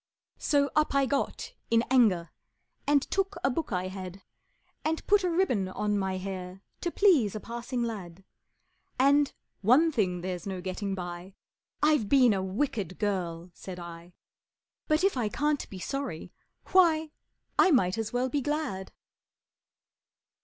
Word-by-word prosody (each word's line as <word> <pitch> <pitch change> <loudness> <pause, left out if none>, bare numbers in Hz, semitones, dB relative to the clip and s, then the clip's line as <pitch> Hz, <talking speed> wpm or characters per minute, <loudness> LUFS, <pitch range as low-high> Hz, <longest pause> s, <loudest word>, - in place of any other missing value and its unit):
So 285 -1 +2
up 305 -2 +2
I 275 -1 +4
got 280 +1 -2 0.2
in 230 0 +4
anger, 205 -10 +3 0.6
And 285 -1 +4
took 390 0 0
a 270 - +3
book 300 +1 -3
I 185 -1 -1
had, 185 0 -8 0.6
And 320 +1 -1
put 410 -1 +4
a 360 - +1
ribbon 330 - +1
on 210 +2 -1
my 190 -2 -1
hair 185 0 -6 0.2
To 350 - -1
please 320 - +3
a - - -3
passing 235 +2 -4
lad, 195 -6 -6 0.7
And, 280 +2 +4 0.3
"One 265 - +5
thing 185 - 0
there's 180 0 -4
no 190 -2 -3
getting 190 +2 -3
by 175 +1 -7 0.5
I've 300 -9 +3
been 250 -4 +6
a 195 - -1
wicked 190 - -2
girl," 180 -4 -2
said 180 +1 -8
I; 170 0 -10 0.7
"But 310 +3 +2
if 390 - +3
I 225 -4 0
can't 295 +4 -1
be 195 - -8
sorry, 265 - -5 0.4
why, 320 -4 +4 0.5
I 385 - +7
might 225 - +3
as 220 -1 -3
well 250 +1 0
be 280 +3 -1
glad!" 290 -10 -3
220 Hz, 150 wpm, -29 LUFS, 185-290 Hz, 0.7 s, I